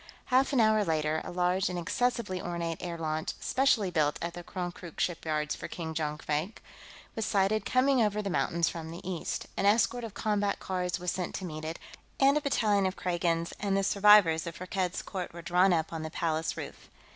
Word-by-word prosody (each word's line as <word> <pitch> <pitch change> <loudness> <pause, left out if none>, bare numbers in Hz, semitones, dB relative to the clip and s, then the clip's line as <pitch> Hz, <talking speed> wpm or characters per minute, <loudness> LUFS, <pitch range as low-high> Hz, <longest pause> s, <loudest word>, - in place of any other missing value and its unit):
Half 265 +3 +4
an 270 - +2
hour 215 -1 +4
later, 155 -2 0
a - - -7
large 180 +1 +1
and 180 - -3
excessively 205 +1 -1
ornate 170 -2 -3
air 175 -2 -4
launch, 155 -1 -2
specially 245 -8 +2
built 150 -3 +1
at 170 0 -4
the 175 - -8
Konkrook 175 -2 -6
shipyards 155 -3 -1
for - - -7
King 160 -2 -5
Jonkvank, 155 +4 -2 0.6
was 225 - -1
sighted 200 +2 +1
coming 260 0 +3
over 210 -1 +1
the 200 - -2
mountain 170 0 -1
from 165 -1 0
the 170 +2 -8
east. 180 -3 -3
An 195 - +1
escort 235 +3 +3
of 225 -3 -7
combat 205 -2 0
cars 180 -1 -2
was 180 -1 -1
sent 180 -2 -3
to 190 - -4
meet 155 -2 -6
it, 160 +2 -4 0.4
and 275 +1 +5
a 300 - +2
battalion 210 -8 +2
of 185 - -3
Kragans 170 -2 -1
and 195 -1 0
the 195 - +1
survivors 200 -5 +5
of 170 - -5
Firkked's 185 0 -2
court 185 -4 -5
were 170 0 -9
drawn 180 +3 +4
up 165 -1 0
on 165 - -3
the 160 - -4
Palace 160 0 -1
roof. - - -8
180 Hz, 200 wpm, -30 LUFS, 165-205 Hz, 0.6 s, and